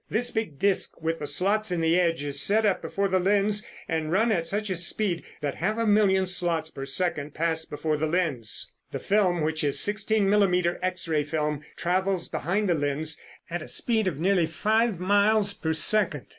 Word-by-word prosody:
This 245 +3 -1
big 220 -11 -3
disc 195 +5 +2
with 165 0 -2
the 145 - -4
slots 210 +6 +1
in 175 - 0
the 165 +2 +3
edge 165 -4 +1
is 140 -1 -1
set 215 +2 +3
up 200 -3 +1
before 200 0 -1
the 190 -1 +1
lens 205 +2 +2 0.2
and 160 -1 -2
run 220 +6 +2
at 170 -5 0
such 205 0 -2
a - - 0
speed 175 +1 -1 0.2
that 145 -2 -2
half 215 +6 -1
a 230 - 0
million 205 -3 +3
slots 170 -3 -1
per 135 - -6
second 150 -1 -1
pass 160 -1 -1
before 150 +1 -2
the 155 +1 -1
lens. 155 - -1 0.2
The - - -3
film, 190 -4 +1
which 155 +1 -1
is 145 -2 0
sixteen 205 0 +1
millimeter 180 -4 +2
X 185 -1 -2
ray 155 -2 +1
film, 150 -1 -2
travels 185 0 -1
behind 200 +4 -1
the 175 - +3
lens 150 +1 -1 0.3
at 175 0 -4
a - - -8
speed 220 -4 0
of 155 -6 -2
nearly 180 -1 +2
five 215 +4 +1
miles 205 +2 +2
per 160 -6 -3
second. 160 -3 +1
180 Hz, 200 wpm, -26 LUFS, 160-205 Hz, 0.3 s, the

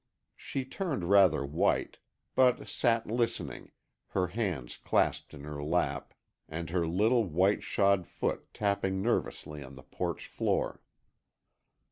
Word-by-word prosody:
She 135 -1 -4
turned 135 - -2
rather 90 -8 +6
white, 75 +3 0 0.3
but 125 -1 +3
sat 115 -2 +2
listening, 115 +1 -2 0.4
her 95 -2 0
hands 90 - -2
clasped - - +1
in 70 - -10
her 75 -1 -5
lap 85 +4 -1 0.3
and 80 0 -5
her 85 -2 +1
little 110 +7 +3
white 95 +4 +2
shod 100 -3 +2
foot 85 - -3
tapping 95 -2 0
nervously 75 -9 -1
on 70 0 -10
the 65 - -12
porch - - -4
floor. - - -1
95 Hz, 125 wpm, -31 LUFS, 80-115 Hz, 0.4 s, rather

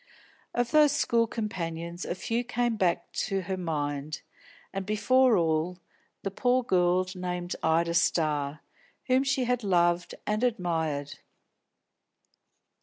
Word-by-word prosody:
Of 240 0 0
those 300 -2 +5
school 235 -5 +2
companions 170 -6 -4
a - - -3
few 230 +6 -2
came 240 -1 0
back 180 -5 0 0.2
to 195 -2 -1
her 190 +1 -3
mind, 150 -4 -3 0.5
and, 195 0 -2
before 240 +4 +3
all, 165 +1 0 0.5
the 195 - -2
poor 250 +5 +2
girl 180 -3 +2
named 180 -1 -4
Ida 165 +1 +2
Starr, 150 -3 +1 0.4
whom 260 +1 +3
she 270 -1 +1
had 245 -1 0
loved 175 -2 +2
and 215 +2 -1
admired. 160 - -1
180 Hz, 120 wpm, -28 LUFS, 170-235 Hz, 0.5 s, those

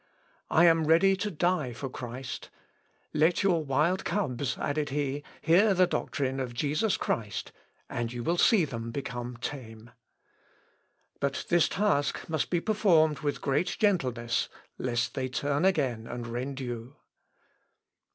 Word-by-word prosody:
I 170 - +5
am 165 -2 +4
ready 190 +5 +5
to 210 +3 -2
die 175 -7 0
for 135 +4 -5
Christ. 125 0 -7 0.6
Let 160 +5 +3
your 175 -5 +2
wild 150 +7 +1
cubs," 135 - -1
added 145 +1 -1
he, 145 0 -1 0.2
"hear 195 +5 +4
the 185 0 +5
doctrine 135 -6 -2
of 125 -2 -4
Jesus 155 - +1
Christ, 105 -3 -2 0.4
and 120 -1 -3
you 120 -1 -5
will 170 +5 0
see 205 -8 +5
them 115 -4 -5
become 120 -1 -5
tame. 115 -4 -7 1.3
But 140 0 -1
this 170 -2 +4
task 195 -8 0
must 155 -3 -1
be 175 - +1
performed 165 -8 +3
with 145 0 -2
great 145 +6 0
gentleness, 125 - +1 0.3
lest 120 -1 -1
they 130 -2 -2
turn 145 +5 0
again 130 -11 +1
and 120 -1 -5
rend 125 +4 -4
you." 120 +1 -6
140 Hz, 140 wpm, -29 LUFS, 125-170 Hz, 1.3 s, I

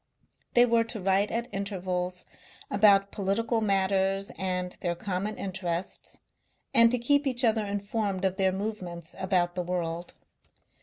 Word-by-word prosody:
They 240 0 +7
were 230 -1 +3
to 230 -1 -5
write 195 +2 +2
at 235 +1 -2
intervals 185 -2 -3 0.5
about 200 -1 +5
political 220 +4 0
matters 195 -1 +1
and 180 -1 -2
their 175 -1 -1
common 200 +3 -3
interests, 180 -2 -3 0.5
and 230 0 +7
to 250 - +2
keep 285 +4 +2
each 255 -1 0
other 220 -2 +3
informed 200 -1 -2
of 190 0 0
their 190 -1 +3
movements 185 -4 -5
about 180 -2 +1
the 180 - -2
world. 175 -1 -3
195 Hz, 140 wpm, -28 LUFS, 180-215 Hz, 0.5 s, They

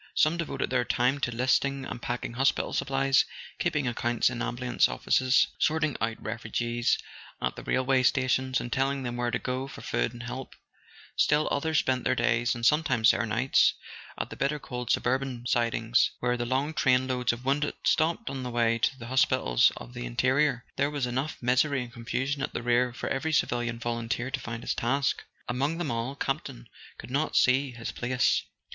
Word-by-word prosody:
Some 155 +2 +3
devoted 170 -6 -3
their 125 -1 +2
time 125 +4 +1
to 125 - -1
listing 130 +3 +1
and 120 - -6
packing 120 -1 -3
hospital 135 +3 +1
supplies, 135 0 +2 0.4
keeping 150 -6 0
accounts 120 0 +1
in 120 -1 -4
ambulance 125 0 +1
offices, 130 0 +3
sorting 155 -2 +1
out 115 0 -1
refugees 120 +1 -1 0.4
at - - -2
the - - -8
rail¬ 130 - 0
way 130 0 +3
stations, 130 0 +2
and 120 - -4
telling 135 +1 0
them 120 -1 -3
where 120 0 -1
to - - 0
go 130 +1 -3
for - - -10
food - - -1
and 120 0 -9
help; 125 +2 -7 0.6
still 150 +1 +3
others 160 +2 0
spent 130 -2 +1
their 130 - +1
days, 120 -1 +1
and 120 -1 -3
sometimes 150 -7 +4
their 115 - -1
nights, 120 +5 +3 0.4
at - - -4
the - - -6
bitter 140 +2 0
cold 125 -4 -6
suburban 130 -1 0
sidings 115 -1 +2
where 125 0 +1
the 120 -1 -3
long 135 +5 0
train 130 -3 +3
loads 125 -1 +1
of 120 +2 -7
wounded 145 +2 0
stopped 165 +1 +1
on 135 -1 -3
the 125 - -4
way 115 -1 +1
to 130 +3 +1
the 115 - -9
hospitals 120 - +3
of - - -10
the - - -5
interior. 130 - +1
There 140 +1 +2
was 145 -3 -2
enough 130 +5 -2
misery 130 +2 +2
and 120 -1 -11
confusion 130 +4 -2
at - - -3
the - - -3
rear 120 +1 +2
for 120 - -5
every 160 +4 -1
civilian 120 -4 0
volunteer 120 +1 -3
to 130 - -2
find 115 -2 -6
his - - -1
task. 140 +4 0 0.2
Among 140 +6 -1
them 170 -7 -2
all, 115 +4 -2
Campton - - -4 0.3
could - - -10
not 145 +4 0
see 130 +1 +3
his 120 0 -5
place. 125 +1 +1
125 Hz, 190 wpm, -28 LUFS, 120-135 Hz, 0.6 s, sometimes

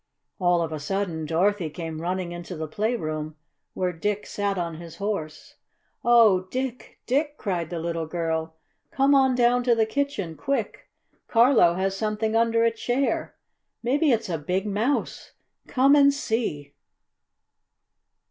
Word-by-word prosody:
All 175 -2 +3
of 160 - -4
a 155 - -4
sudden 165 0 -3
Dorothy 180 +1 +1
came 160 0 -6
running 180 0 -2
into 175 +1 -7
the 155 0 -4
playroom 155 -6 -2 0.4
where 180 -1 -1
Dick 205 +5 -2
sat 200 -1 -2
on 170 -2 -3
his 165 -1 -10
Horse. 170 -6 -5 0.5
"Oh, 220 -6 +5
Dick! 255 +1 -5
Dick!" 290 +3 0
cried 175 -5 -2
the 175 - -4
little 165 -1 -3
girl. 160 -1 -2 0.3
"Come 275 +1 +3
on 265 -2 +4
down 245 0 +3
to 240 -2 +4
the 225 -1 +3
kitchen, 220 - -2
quick! 235 - -3 0.4
Carlo 230 -7 +5
has 190 +1 -1
something 215 +1 -1
under 230 0 +3
a 230 - +4
chair! 245 +4 -1 0.5
Maybe 290 +6 +2
it's 225 -2 +1
a 165 -4 -2
big 180 +7 -1
mouse! 215 +7 -2 0.3
Come 275 +2 +4
and 280 -1 +6
see!" 220 - -3
200 Hz, 145 wpm, -25 LUFS, 165-240 Hz, 0.5 s, and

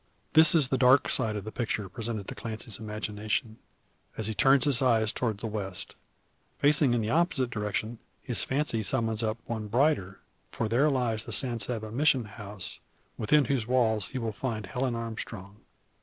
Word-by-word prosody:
This 160 +1 +7
is 145 -5 +4
the 130 - 0
dark 130 +2 +5
side 110 -1 +2
of 105 - -4
the 110 - -7
picture 110 -4 -3
presented 110 0 -5
to - - -5
Clancy's 110 -1 -4
imagination, 110 +1 -3 0.6
as 110 - -2
he 110 - 0
turns 135 +3 +4
his 140 -4 +4
eyes 115 -4 +2
towards 110 -5 -2
the - - -4
west. 100 -4 -5 0.6
Facing 145 -3 +3
in 120 - 0
the 110 +1 -2
opposite 160 -7 +1
direction 110 +1 -3 0.2
his 120 - 0
fancy 135 -4 -1
summons 110 +1 0
up 110 0 -1
one 110 -2 -4
brighter. 115 -5 +1 0.3
For - - -3
there 125 +7 +3
lies 120 -5 -1
the - - -7
San 120 +1 +2
Saba 110 -2 +1
Mission 130 -1 +2
house, 105 -3 -8 0.4
within 140 +6 +3
whose 120 -3 -1
walls 110 -5 +2
he 130 - -6
will 115 -3 -2
find 110 -1 -4
Helen 125 +1 -2
Armstrong. 110 -3 -6
115 Hz, 175 wpm, -28 LUFS, 110-130 Hz, 0.6 s, This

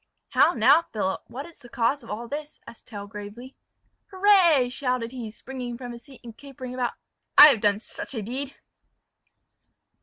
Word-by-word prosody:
"How 345 - +4
now, 270 +8 +5
Philip! 195 -4 -2
what 275 +4 -7
is 340 - -16
the 245 -4 -15
cause 250 +4 0
of - - -14
all 230 +3 -5
this?" 295 +3 -7
asked 230 - -14
Tell 205 -3 -8
gravely. 210 +5 -10 0.5
"Hurrah!" 375 -9 +4
shouted 250 -2 -2
he, 245 -4 -6
springing 245 +1 -7
from 245 -1 -8
his 235 0 -10
seat, 270 0 -16
and 230 -2 -11
capering 260 -2 -9
about, 250 -1 -2 0.4
"I 295 +1 +12
have 235 -7 +1
done 205 -1 +2
such 230 +4 -7
a 220 - -3
deed!" 265 +6 -5
250 Hz, 175 wpm, -25 LUFS, 230-280 Hz, 0.5 s, I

